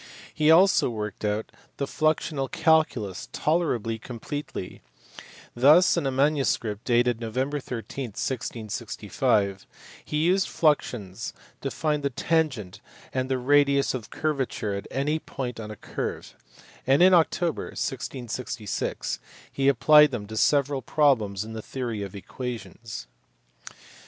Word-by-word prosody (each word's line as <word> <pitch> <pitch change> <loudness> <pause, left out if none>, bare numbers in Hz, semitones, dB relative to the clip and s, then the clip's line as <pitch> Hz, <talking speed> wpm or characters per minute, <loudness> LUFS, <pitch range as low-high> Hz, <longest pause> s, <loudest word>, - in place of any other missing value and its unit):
He 155 0 +2
also 180 0 +6
worked 105 -3 -5
out 105 +1 -1 0.3
the 140 - -1
fluxional 155 -2 0
calculus 125 - +1
tolerably 125 -9 0
completely: 125 -2 -6 0.7
thus 150 +9 +6
in 165 -5 0
a - - 0
manuscript 130 -6 +1
dated 120 -1 +2
Nov. 110 -1 -5
13, 130 -2 -3
1665, 110 -4 -2 0.4
he 150 - -3
used 180 +5 +3
fluxions 120 - 0 0.3
to 135 - -2
find 150 +1 -1
the 140 - 0
tangent 130 - -1 0.3
and 130 0 -1
the 130 - +1
radius 140 +1 +3
of 120 -4 -5
curvature 135 -8 -2
at 100 - -5
any 150 +4 0
point 125 -6 -5
on 105 -1 -6
a 110 - -7
curve, - - -5 0.5
and 135 +5 +5
in 185 0 +7
October, 170 0 +2
1666, 125 -5 -4 0.3
he 135 0 0
applied 150 +3 +7
them 120 -6 -4
to 110 +2 -8
several 140 +3 +2
problems 110 -8 +2
in 110 - -8
the 110 - -5
theory 120 -3 -4
of 100 0 -6
equations. 115 - -7
130 Hz, 125 wpm, -26 LUFS, 110-150 Hz, 0.7 s, in